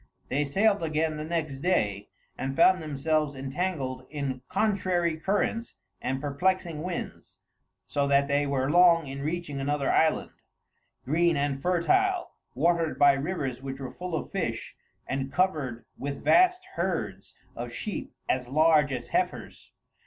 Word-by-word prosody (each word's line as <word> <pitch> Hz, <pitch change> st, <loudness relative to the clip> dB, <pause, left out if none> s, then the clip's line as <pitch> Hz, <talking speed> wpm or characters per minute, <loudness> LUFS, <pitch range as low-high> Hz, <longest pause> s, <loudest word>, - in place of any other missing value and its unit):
They 145 Hz, +2 st, +1 dB
sailed 200 Hz, +7 st, +2 dB
again 155 Hz, -1 st, 0 dB
the 150 Hz, -, -4 dB
next 155 Hz, -4 st, -2 dB
day, 105 Hz, -, 0 dB, 0.3 s
and 135 Hz, +1 st, -3 dB
found 180 Hz, +3 st, +5 dB
themselves 150 Hz, 0 st, 0 dB
entangled 135 Hz, -2 st, -3 dB
in 140 Hz, -4 st, -3 dB
contrary 185 Hz, -6 st, +1 dB
currents 205 Hz, +6 st, -1 dB, 0.3 s
and 130 Hz, +1 st, -2 dB
perplexing 160 Hz, +3 st, -1 dB
winds, 180 Hz, +1 st, -6 dB, 0.5 s
so 140 Hz, -1 st, 0 dB
that 140 Hz, 0 st, +3 dB
they 145 Hz, +1 st, +1 dB
were 135 Hz, -1 st, 0 dB
long 170 Hz, -1 st, +6 dB
in 135 Hz, 0 st, -6 dB
reaching 155 Hz, -1 st, -3 dB
another 145 Hz, 0 st, 0 dB
island, 160 Hz, -1 st, +2 dB, 0.7 s
green 165 Hz, +3 st, +2 dB
and 140 Hz, -1 st, -1 dB
fertile, 355 Hz, -, +2 dB, 0.2 s
watered 165 Hz, +3 st, +1 dB
by 145 Hz, -1 st, +6 dB
rivers 135 Hz, -3 st, -3 dB
which 135 Hz, 0 st, -6 dB
were 130 Hz, -2 st, -6 dB
full 180 Hz, -2 st, -4 dB
of -, -, -4 dB
fish, -, -, -3 dB, 0.3 s
and 135 Hz, 0 st, -3 dB
covered 145 Hz, -8 st, 0 dB
with 140 Hz, +1 st, -5 dB
vast 365 Hz, +1 st, +4 dB
herds 165 Hz, -, -3 dB, 0.2 s
of 120 Hz, 0 st, -5 dB
sheep 205 Hz, -, -5 dB, 0.2 s
as 125 Hz, -1 st, -1 dB
large 155 Hz, 0 st, +4 dB
as 125 Hz, -2 st, -4 dB
heifers. -, -, -2 dB
150 Hz, 140 wpm, -27 LUFS, 135-175 Hz, 0.7 s, long